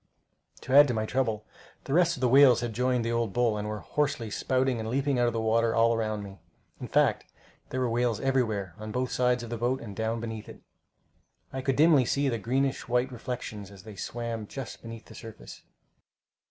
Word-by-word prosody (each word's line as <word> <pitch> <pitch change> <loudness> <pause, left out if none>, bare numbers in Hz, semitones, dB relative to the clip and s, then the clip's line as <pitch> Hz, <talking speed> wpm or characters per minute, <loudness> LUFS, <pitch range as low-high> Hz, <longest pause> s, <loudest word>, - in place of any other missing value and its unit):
To 130 - -4
add 145 +1 +9
to 125 - -1
my 110 0 -1
trouble, 110 -3 -1 0.4
the 135 - -4
rest 170 -1 +3
of - - -9
the 130 - +3
whales 130 -2 +6
had 120 -2 -3
joined 125 0 0
the 115 - -1
old 115 -4 -1
bull, 120 -3 +2
and 105 0 -3
were 105 0 -4
hoarsely 140 -7 -1
spouting 130 0 0
and 110 0 -4
leaping 135 +1 0
out 120 - +3
of 120 - 0
the 115 - -1
water 115 +1 +2
all 115 0 +4
around 110 -2 -2
me. 100 -1 -10 0.4
In - - -6
fact, - - +2 0.4
there 130 - -3
were 130 - +1
whales 120 -1 0
everywhere, 115 -9 0
on 110 0 -6
both 125 +2 -2
sides 125 -1 +1
of 120 - -8
the 120 - -2
boat, 125 +3 0
and 105 -4 -9
down 110 +1 -1
beneath 110 -2 -6
it. - - -13 0.9
I 130 - -3
could 135 0 0
dimly 150 -3 +5
see 140 +3 +1
their 115 -3 -2
greenish 135 +6 -1
white 125 +2 +1
reflections 115 -5 -6
as 100 -2 -14
they 110 -2 -10
swam 115 0 -5
just 135 +1 -7
beneath 115 -1 -9
the - - -14
surface. 110 - -11
120 Hz, 215 wpm, -28 LUFS, 110-130 Hz, 0.9 s, add